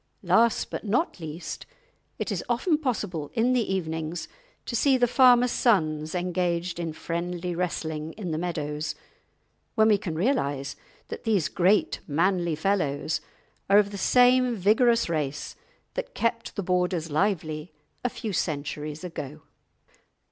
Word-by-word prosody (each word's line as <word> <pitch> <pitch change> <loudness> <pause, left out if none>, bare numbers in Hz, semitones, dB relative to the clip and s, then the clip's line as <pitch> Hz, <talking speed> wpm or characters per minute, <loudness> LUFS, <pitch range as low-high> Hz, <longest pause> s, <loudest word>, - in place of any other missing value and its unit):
Last, 230 0 +3
but - - -4
not 230 - 0
least, 160 +1 -6 0.5
it - - -3
is - - -2
often 300 +7 +2
possible 205 - -2
in 240 +3 +3
the 235 -6 +1
evenings 160 -2 -3 0.4
to 235 - -3
see 270 +2 +4
the 245 - +4
farmers' 250 0 +5
sons 155 -8 +1
engaged 175 -1 -1
in 165 -2 -2
friendly 175 +2 -3
wrestling 160 -3 -3
in 190 -6 -5
the 155 - -1
meadows, 155 -3 -3 0.8
when 220 -1 +5
we 205 -2 +4
can 180 -6 -4
realise 145 - 0 0.3
that - - -6
these 210 -8 +1
great 190 +4 +2
manly 170 +2 +1
fellows 155 -4 0 0.5
are 200 - +7
of 205 -1 +4
the 200 - -5
same 250 +2 +4
vigorous 230 +4 +3
race 150 -4 -3 0.4
that - - -5
kept 230 0 -1
the 200 - -2
Borders 180 -3 0
lively 155 -2 -1 0.3
a 250 - +1
few 220 -3 -5
centuries 150 -1 -3
ago. 155 -4 -7
180 Hz, 140 wpm, -26 LUFS, 155-225 Hz, 0.8 s, are